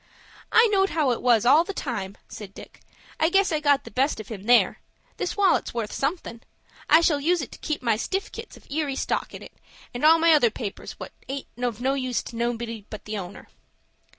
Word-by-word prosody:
"I 455 - +6
knowed 390 -1 +3
how 300 -6 +1
it 240 - -2
was 240 -3 +3
all 290 +6 +6
the 385 +2 -7
time," 205 -7 -4
said 200 -2 -10
Dick. - - -13 0.4
"I 320 - +3
guess 390 +1 +3
I 310 - +1
got 285 -2 +3
the - - -11
best 270 +1 0
of 215 - -9
him 205 -3 -8
there. 245 +1 +4 0.4
This 360 - -3
wallet's 390 -10 +2
worth 225 -3 -3
somethin'. 275 -6 -3 0.5
I 320 - +7
shall 310 -4 +2
use 350 +4 +2
it - - -8
to - - -12
keep 305 -4 -3
my 230 -3 +2
stiffkit's 390 - -5
of - - -19
Erie 290 -2 -1
stock - - -2
in, - - -9 0.5
and 245 - -5
all 320 +2 +7
my 330 0 +5
other 285 -6 +5
papers 210 -2 -6
what - - -9 0.2
aint 275 0 -4 0.2
of 240 -2 -2
no 265 +2 +1
use 255 -3 -2
to 235 - -10
anybody 230 -3 -3
but 215 - -9
the 210 -1 -4
owner." 185 +1 -9
265 Hz, 210 wpm, -25 LUFS, 230-320 Hz, 0.5 s, I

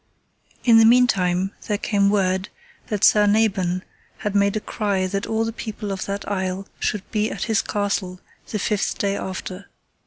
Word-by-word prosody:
In 230 -2 +7
the - - +7
meantime 195 -6 +3 0.2
there 210 - 0
came 200 -2 +2
word 190 -2 +1 0.4
that 210 -2 -3
Sir 210 -1 +6
Nabon 195 -4 +1 0.3
had 210 -2 -3
made 200 0 +2
a - - 0
cry 200 -3 -1
that 195 +1 -2
all 225 0 0
the 225 - -3
people 215 -2 -5
of 190 -1 -3
that 200 0 -4
isle 190 -1 -2
should 205 -3 -1
be 215 0 +1
at - - -4
his 220 -3 +1
castle 200 -3 -2 0.3
the 215 - -2
fifth 210 0 -1
day 200 -1 0
after. 190 0 -6
200 Hz, 175 wpm, -22 LUFS, 190-215 Hz, 0.4 s, In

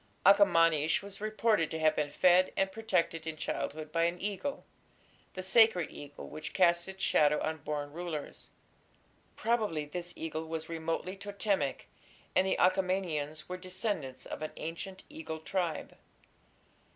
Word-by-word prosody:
Akhamanish 165 -6 +5
was 200 0 -9
reputed 215 -5 +2
to 160 - -3
have 155 -1 +3
been 150 -1 0
fed 180 +4 +4
and 195 0 +2
protected 180 -6 0
in 160 -1 -4
childhood 155 0 -3
by 165 +1 +2
an 170 +1 -1
eagle 210 +9 -3 0.7
the 185 - -4
sacred 190 -4 +5
eagle 145 0 -9
which 155 +1 -7
cast 175 -1 +4
its 190 0 -7
shadow 150 0 +4
on 160 0 -2
born 145 -1 -4
rulers. 165 -3 -6 0.9
Probably 215 -10 0
this 175 +3 -6
eagle 160 0 -4
was 160 0 -4
remotely 165 +3 -3
Totemic, 200 -6 -1 0.5
and 190 - +4
the - - +1
Achaemenians 180 -5 +1
were 180 - -4
descendants 185 - -4
of - - -6
an 155 - -4
ancient 185 +4 -6
eagle 160 0 -6
tribe. 170 -1 -2
170 Hz, 140 wpm, -32 LUFS, 155-190 Hz, 0.9 s, Akhamanish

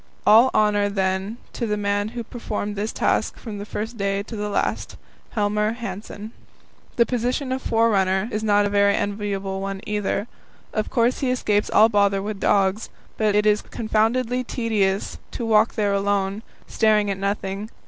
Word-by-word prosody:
All 225 +5 +7
honour, 205 -1 +3
then, 190 +2 -1 0.2
to 235 - -3
the 210 -1 -1
man 205 0 0
who 235 - -2
performed 210 -3 -4
this 210 +2 -2
task - - 0
from 215 -4 -7
the 205 - -7
first 220 +3 -5
day 200 0 0
to 225 - -8
the 210 0 -3
last 200 - -2 0.4
Helmer 210 0 +1
Hanssen. 215 -2 -7 0.6
The 235 - +4
position 250 +3 -1
of 260 0 -1
the - - -5
"forerunner" 200 -4 +2
is 215 +1 -2
not 205 -1 +3
a - - 0
very 200 0 +3
enviable 200 -2 -2
one 195 0 -4
either. 210 +1 -1 0.5
Of 215 - -1
course 240 0 +1
he 265 - 0
escapes 210 -5 +1
all 220 - +6
bother 200 -2 +2
with 210 -1 -4
dogs, 195 +2 +1 0.3
but 215 -2 +2
it 210 0 +3
is 210 0 +3
confoundedly 230 +3 0
tedious 210 -6 -1
to 235 - -3
walk 220 0 +3
there 205 -2 +1
alone, 200 0 0 0.2
staring 215 -2 +2
at 195 - -4
nothing. 200 +1 -3
210 Hz, 170 wpm, -23 LUFS, 200-225 Hz, 0.6 s, All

